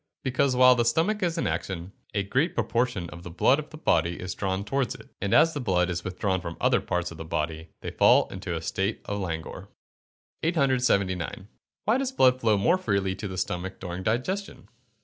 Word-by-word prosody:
_ - - -52 0.2
Because, 130 0 +1
while 125 0 +7
the 120 -1 +2
stomach 165 - +1
is 175 -2 0
in - - 0
action, 95 -1 -3 0.2
a 100 - +1
great 135 - 0
proportion 115 -7 0
of 85 - -9
the 90 - -8
blood 90 - +3
of 155 - -7
the 155 - -10
body 85 - +1
is 90 0 -4
drawn 95 0 -2
towards 135 +4 -1
it, - - -14
and 100 - -1
as 165 +6 +5
the 145 - -3
blood 90 -7 +1
is 85 - -3
withdrawn 95 0 -1
from 85 -1 -6
the - - -14
other - - +4
parts 90 -1 -2
of 85 - -9
the - - -4
body, 80 0 -3
they - - -5
fall - - +5
into - - -5
a - - -4
state 100 +3 -2
of 100 0 -3
languor. 80 -4 -5 0.7
879. 125 - +1 0.4
_Why 230 +5 +3
does 270 -1 -1
blood 130 - +4
flow 110 -2 +3
more 170 - +3
freely 100 - 0
to 105 - -5
the 95 -1 -6
stomach 95 +1 -3
during 90 0 -5
digestion? 130 - -2
100 Hz, 210 wpm, -27 LUFS, 90-130 Hz, 0.7 s, while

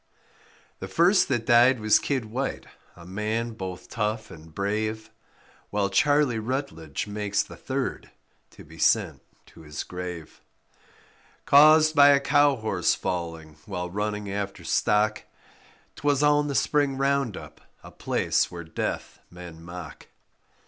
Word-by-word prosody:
The - - -6
first 180 +4 +3
that 120 -4 -1
died 120 +2 +5
was 110 -1 +4
Kid 135 -5 -2
White, 125 +5 -4 0.3
a 85 - -14
man 110 +5 -3
both 95 -5 -7
tough 110 0 -3
and 80 0 -13
brave, 110 +4 -3 0.6
While 100 -1 -1
Charlie 145 +1 +2
Rutlage 110 - -4
makes 105 -1 -1
the - - -12
third - - -4 0.4
to - - -15
be 80 +1 -15
sent - - +2 0.2
to - - -17
his 75 -1 -6
grave, 90 -3 -8 1.0
Caused 155 +2 +6
by 145 -1 +8
a 140 -1 +6
cow 145 0 +3
horse 110 -7 0
falling 80 -3 -5
while 90 0 -4
running 105 +1 -3
after 100 0 -4
stock; 105 0 +1 0.8
'Twas 145 -2 +1
on 145 0 +3
the 140 - -3
spring 145 -2 +1
round 135 -5 0
up, - - -12 0.2
a - - -12
place - - 0
where 85 -1 -8
death 80 - -5
men 90 -2 -11
mock. 85 0 -10
110 Hz, 135 wpm, -25 LUFS, 90-135 Hz, 1.0 s, by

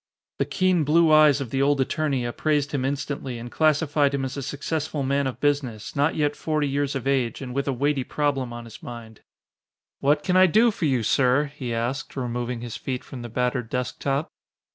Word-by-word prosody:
The - - +2
keen 185 -3 +2
blue 160 +2 +4
eyes 150 -2 +6
of 125 -5 -5
the 135 - 0
old 140 0 +3
attorney 135 -1 0
appraised 145 +3 0
him 140 -3 -1
instantly 135 -2 -3
and 120 +1 -8
classified 150 -2 +2
him 135 -1 -1
as 130 - -5
a 140 - -4
successful 145 +1 -3
man 140 +1 +1
of 125 -2 -5
business, 140 -7 -1
not 145 +3 +2
yet 145 -1 +1
forty 155 -2 -1
years 140 0 -1
of 135 -2 -3
age, 130 -4 0
and 130 -2 -6
with 140 +2 -1
a - - +2
weighty 140 +1 0
problem 140 -3 -1
on 120 0 -7
his 110 -1 -12
mind. 115 -2 -9 0.8
"What 145 +2 +2
can 180 +4 +1
I 185 0 +7
do 225 +7 +4
for 185 - -3
you, 130 -5 +1
sir?" 135 +5 +2
he 125 -5 -5
asked, 120 +5 -3
removing 120 -2 -3
his 120 -2 -6
feet 130 -2 -4
from 130 - -9
the 120 - -7
battered 125 0 -1
desk 125 0 -3
top. 140 +2 -1
140 Hz, 205 wpm, -24 LUFS, 125-145 Hz, 0.8 s, I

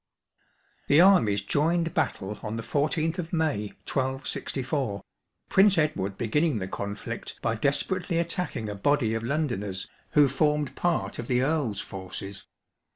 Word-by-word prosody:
The 145 - +6
armies 125 - +5
joined 165 - +1
battle 100 +2 -1
on 110 +1 -4
the 115 - -4
14th 155 - 0
of 170 -1 -4
May, 155 - 0 0.2
1264, 130 -3 -2 0.4
Prince 195 0 +5
£dward 100 - 0
beginning 150 +4 +1
the 95 -2 -3
conflict 100 +2 -5
by 115 - +1
desperately 165 - 0
attacking 170 -8 -2
a 105 - -3
body 115 +2 +1
of 115 - -1
Londoners, 115 -8 -2 0.3
who 145 -1 +6
formed 150 +1 +1
part 175 -1 0
of 120 - -4
the 125 0 +2
Earl's 135 -8 0
forces. 95 +1 -7
135 Hz, 135 wpm, -27 LUFS, 105-160 Hz, 0.4 s, The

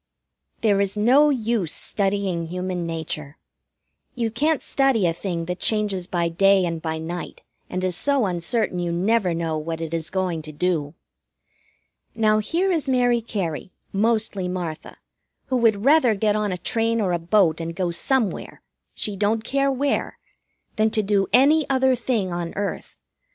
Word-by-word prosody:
There 205 -3 +3
is 200 +1 -1
no 260 +8 +5
use 225 - 0
studying 195 -4 -1
Human 180 0 -3
Nature. 155 -3 -5 0.8
You 230 -2 -1
can't 300 +6 0
study 270 -8 +2
a 165 - +2
thing 170 -1 -4
that 180 +1 -4
changes 205 -5 0
by 175 -2 0
day 195 +3 +3
and 165 -2 -3
by 160 -1 -3
night, 170 +2 -6 0.3
and 185 0 -3
is 185 -2 0
so 280 -1 +2
uncertain 185 +2 -1
you 175 -1 -1
never 185 +1 +1
know 165 -2 -2
what 160 +1 -4
it 165 0 -5
is 165 -1 -1
going 185 -4 -2
to 155 0 -9
do. 155 -1 -1 1.2
Now, 215 -1 +3
here 350 - 0
is 315 -5 -1
Mary 245 -2 +2
Cary, 185 -6 -4 0.2
mostly 210 -2 0
Martha, 175 -3 -5 0.5
who 260 - +1
would 220 -3 +2
rather 275 -6 +5
get 210 +1 +1
on 210 -2 0
a 180 - -2
train 230 +5 0
or 195 -4 0
a 170 - 0
boat 170 -2 +2
and 165 0 -5
go 180 -2 -1
somewhere 235 +3 -1 0.3
she 210 - -1
don't 215 +3 0
care 275 +3 +1
where 275 +1 -1 0.6
than 215 +1 +3
to 215 0 0
do 200 -1 +1
any 280 +5 +4
other 265 -1 +3
thing 235 -6 -1
on 175 -1 -4
earth. 200 0 -4
200 Hz, 165 wpm, -23 LUFS, 170-230 Hz, 1.2 s, no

